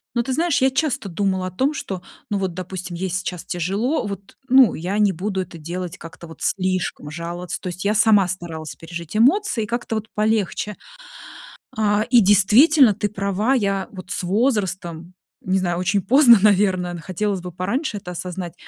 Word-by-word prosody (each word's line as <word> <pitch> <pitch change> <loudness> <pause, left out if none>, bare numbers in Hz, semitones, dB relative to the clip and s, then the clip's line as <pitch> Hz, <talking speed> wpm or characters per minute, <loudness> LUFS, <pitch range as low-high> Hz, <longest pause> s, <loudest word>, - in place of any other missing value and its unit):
но 240 - +2
ты 260 +2 -2
знаешь, 325 +1 +1
я 265 0 +4
часто 265 -5 -1
думала 190 0 -1
о - - -6
том, 265 - 0
что, 190 -10 -5 0.3
ну 205 - 0
вот 190 -2 -2
допустим, 180 0 -6
ей 185 +2 -3
сейчас 180 -1 -4
тяжело, 200 - -1
вот 200 -1 -8
ну 260 -6 +6
я 180 +5 -3
не 210 -2 +3
буду 190 +2 -2
это 180 -2 -8
делать 175 +2 -6
как-то 170 -1 -11
вот 160 - -13
слишком, 185 -5 -1
жаловаться. 170 +3 -5
То - - -6
есть 180 +2 -5
я 210 - +2
сама 210 -3 +4
старалась 165 -3 -6
пережить 170 +1 -8
эмоции 260 - +3
и - - -5
как-то 235 0 -3
вот 220 0 -4
полегче. 210 -1 -1 1.0
А, 210 -1 +2
и 245 -1 +6
действительно, 215 - +5
ты 205 +1 -2
права, 200 +4 0
я 195 -6 0
вот 185 -2 -10
с - - -3
возрастом, 185 -5 -1 0.3
не 190 +1 0
знаю, 175 -2 -1
очень 195 +2 +1
поздно, 240 - +7
наверное 190 -3 +2
хотелось 195 +2 -2
бы 180 0 -7
пораньше 205 - -2
это 180 -3 -8
осознать, 180 -1 -6
195 Hz, 180 wpm, -21 LUFS, 180-215 Hz, 1.0 s, поздно